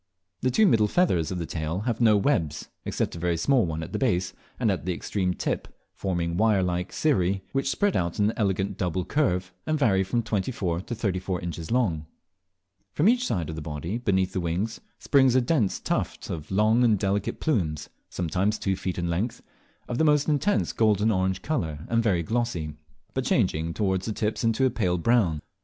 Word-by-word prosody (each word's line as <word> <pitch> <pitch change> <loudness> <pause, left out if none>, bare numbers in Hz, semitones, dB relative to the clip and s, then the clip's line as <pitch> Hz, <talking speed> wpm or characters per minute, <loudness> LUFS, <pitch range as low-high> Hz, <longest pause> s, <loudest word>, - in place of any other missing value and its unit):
The 130 - +2
two 215 - +4
middle 110 - +4
feathers 100 - +2
of 95 - -3
the 85 - -3
tail 80 +3 -3
have 115 0 -2
no 110 -3 +6
webs, 85 - 0 0.2
except - - -2
a - - -6
very 85 0 0
small 125 +3 +3
one 80 0 -3
at 80 - -9
the - - -1
base 90 -8 0 0.3
and 115 -4 +2
at 90 -6 -2
the 90 +1 -1
extreme 90 -1 -1
tip, - - -2 0.3
forming 85 -3 -2
wire 105 -2 +3
like 90 0 -2
cirrhi, 95 - +1
which 135 0 0
spread 205 +4 +1
out 85 -1 -1
in 105 +1 +3
an - - -10
elegant 100 -2 -1
double 90 -1 -1
curve, 90 -11 0
and 155 0 +1
vary 100 -9 +3
from 115 +5 -1
twenty 110 0 -1
four 90 -7 -2
to 120 - -5
thirty 100 -4 -1
four 90 -1 -3
inches 85 -1 -5
long. 90 -11 0 0.9
From 155 - +2
each 245 +2 +3
side 85 -6 -1
of 80 - -5
the 80 - -5
body, 80 +8 -4
beneath 95 -5 +1
the - - -1
wings, 90 +7 -2 0.2
springs 130 -3 +3
a - - +6
dense 120 - +1
tuft - - -3
of 80 -3 -6
long 110 +5 +3
and 110 -3 +4
delicate 100 +1 -1
plumes, 85 - -1 0.2
sometimes 95 +5 0
two 95 -2 -1
feet 95 -1 -4
in 85 -1 -1
length, 95 +8 -2 0.4
of 120 - -3
the - - +4
most 150 -2 +3
intense 160 +7 +1
golden 110 -1 +3
orange 95 -1 0
colour 80 - -2
and 115 0 +2
very 95 -7 +1
glossy, 85 -7 -2 0.4
but - - -1
changing 80 +2 +1
towards 95 0 -1
the 110 - -1
tips 105 +3 -2
into 115 +3 +2
a 130 - +2
pale 90 -7 0
brown. 90 -6 +2
95 Hz, 205 wpm, -26 LUFS, 85-115 Hz, 0.9 s, no